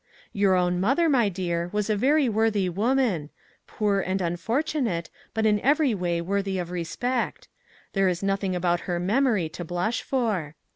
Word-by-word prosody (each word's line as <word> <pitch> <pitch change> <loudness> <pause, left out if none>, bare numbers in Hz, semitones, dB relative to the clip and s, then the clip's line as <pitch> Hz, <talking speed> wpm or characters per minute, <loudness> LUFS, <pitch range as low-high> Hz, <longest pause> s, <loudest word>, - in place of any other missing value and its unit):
" - - -26
Your 200 -2 +3
own 180 0 +1
mother, 270 - +2
my 245 -8 +3
dear, 175 -2 -2
was 210 -1 -1
a 215 - +1
very 275 +6 +3
worthy 220 -3 +1
woman; 205 - 0 0.4
poor, 205 -2 0
and 190 0 -1
unfortunate, 215 - -1 0.2
but 220 0 +1
in 210 -1 +3
every 285 +1 +3
way 175 -3 -1
worthy 195 +2 -1
of 175 -1 -4
respect. 235 +9 -2 0.5
There 195 -2 +3
is 180 +1 -3
noth 195 0 0
ing 185 -2 0
about 175 -1 +1
her 175 -1 0
memory 210 -1 +2
to 175 - -7
blush 175 +7 -1
for. 210 - -1
195 Hz, 175 wpm, -25 LUFS, 175-230 Hz, 0.5 s, Your